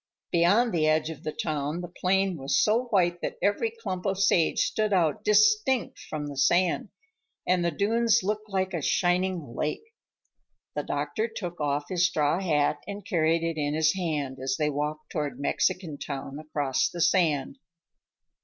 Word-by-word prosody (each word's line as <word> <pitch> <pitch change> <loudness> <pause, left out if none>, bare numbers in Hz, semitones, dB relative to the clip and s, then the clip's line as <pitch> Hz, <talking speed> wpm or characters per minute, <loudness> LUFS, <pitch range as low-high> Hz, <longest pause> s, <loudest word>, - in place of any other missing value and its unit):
Beyond 200 +8 +3
the 155 -2 +2
edge 155 +1 +2
of 155 -2 -10
the 155 - -3
town 150 +1 -3
the 175 - -6
plain 190 +2 0
was 135 -2 0
so 225 +4 +2
white 175 -6 +1
that - - -4
every 205 - +1
clump 215 - -5
of 195 0 0
sage 175 -4 +3
stood 215 -1 0
out 165 -6 +1
distinct 215 +4 +3
from 150 -1 -5
the 145 -1 -7
sand, 175 +6 +2 0.6
and 180 -1 +2
the 170 - +2
dunes 225 +6 +2
looked 210 +2 -2
like 190 -1 -1
a 170 - -2
shining 180 -4 0
lake. 445 - -3 0.8
The 150 - -1
doctor 145 +10 -2
took 175 -7 -6
off 145 0 0
his 180 -1 +2
straw 155 -1 +1
hat 150 -4 +1
and 200 -1 -7
carried 165 -1 +1
it 165 -1 -2
in 145 0 -1
his 155 0 +3
hand 150 -8 -3
as 130 0 -1
they 150 -1 +1
walked 150 +2 -4
toward 145 -4 -3
Mexican 165 +1 -1
Town, 140 0 -6
across 145 -3 -1
the 175 - -8
sand. 165 -6 +2
170 Hz, 170 wpm, -27 LUFS, 150-195 Hz, 0.8 s, Beyond